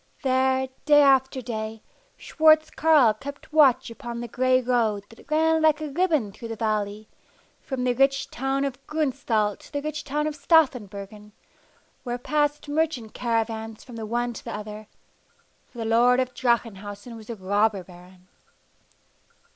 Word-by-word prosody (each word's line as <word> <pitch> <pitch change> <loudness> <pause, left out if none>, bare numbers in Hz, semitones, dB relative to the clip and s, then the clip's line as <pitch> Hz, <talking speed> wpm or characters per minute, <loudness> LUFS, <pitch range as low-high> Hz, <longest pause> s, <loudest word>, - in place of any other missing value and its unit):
There, 260 0 +2 0.2
day 295 -1 +6
after 265 -1 +3
day, 220 -2 -5 0.3
Schwartz 315 0 +3
Carl 300 -9 +4
kept 280 +6 -10
watch 270 -6 +4
upon 235 0 -7
the 240 - -5
gray 255 +2 +2
road 230 -5 0
that 225 - -17
ran 320 +1 +2
like 310 -1 +4
a 305 -2 -5
ribbon 310 - +1
through 230 +4 -9
the 225 - -5
valley, 215 -1 -2 0.5
from 265 -2 -4
the 250 -1 +2
rich 275 +2 +1
town 270 +2 -1
of 275 -1 -5
Gruenstaldt 255 -9 -1
to - - -16
the 285 - -1
rich 305 0 -4
town 295 +2 -2
of 305 -1 -2
Staffenburgen, 210 - 0 0.7
where 245 -1 -3
passed 295 +3 -1
merchant 290 -7 -1
caravans 225 -2 -2
from 245 - -12
the 220 -1 -6
one 240 +2 -1
to - - -9
the - - -5
other 210 0 -8 0.8
for - - -18
the 225 - -3
lord 240 +3 +4
of 255 -1 -1
Drachenhausen 225 -2 -2
was 220 0 -12
a 235 - -4
robber 205 0 0
baron. 180 +1 -17
245 Hz, 155 wpm, -25 LUFS, 220-280 Hz, 0.8 s, day